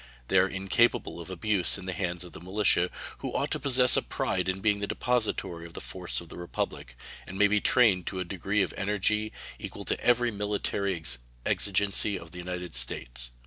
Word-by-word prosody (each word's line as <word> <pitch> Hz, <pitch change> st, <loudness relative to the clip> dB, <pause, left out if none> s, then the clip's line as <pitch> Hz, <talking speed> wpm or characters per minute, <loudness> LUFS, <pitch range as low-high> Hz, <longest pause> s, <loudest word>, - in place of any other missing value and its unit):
They 95 Hz, -, +5 dB
are 95 Hz, -, +4 dB
incapable 95 Hz, -1 st, +1 dB
of 85 Hz, -, -9 dB
abuse 95 Hz, +1 st, +2 dB
in 95 Hz, -, -8 dB
the 95 Hz, -, -3 dB
hands 90 Hz, -3 st, -2 dB
of 90 Hz, -, -11 dB
the -, -, -10 dB
militia, 95 Hz, -1 st, +3 dB, 0.3 s
who -, -, -4 dB
ought -, -, -1 dB
to -, -, -1 dB
possess 125 Hz, -2 st, +4 dB
a -, -, +3 dB
pride 95 Hz, 0 st, -1 dB
in 95 Hz, +1 st, -1 dB
being 105 Hz, 0 st, +2 dB
the 100 Hz, -, -2 dB
depository 110 Hz, -9 st, -1 dB
of 85 Hz, -, -16 dB
the -, -, -4 dB
force 90 Hz, -1 st, -4 dB
of 85 Hz, -, -10 dB
the -, -, -10 dB
Republic, 75 Hz, -7 st, -4 dB, 0.3 s
and 95 Hz, -, -7 dB
may 105 Hz, -, +6 dB
be 105 Hz, 0 st, +2 dB
trained 105 Hz, -8 st, +4 dB
to 95 Hz, -, -3 dB
a 90 Hz, -, -2 dB
degree 95 Hz, +3 st, 0 dB
of 95 Hz, -, -4 dB
energy 105 Hz, +2 st, 0 dB, 0.3 s
equal -, -, -7 dB
to -, -, -1 dB
every 120 Hz, 0 st, +3 dB
military 100 Hz, -2 st, -1 dB, 0.5 s
exigency 100 Hz, 0 st, +3 dB
of 85 Hz, -2 st, -11 dB
the 90 Hz, -, -8 dB
United 90 Hz, -2 st, -5 dB
States. -, -, 0 dB
95 Hz, 200 wpm, -28 LUFS, 90-105 Hz, 0.5 s, may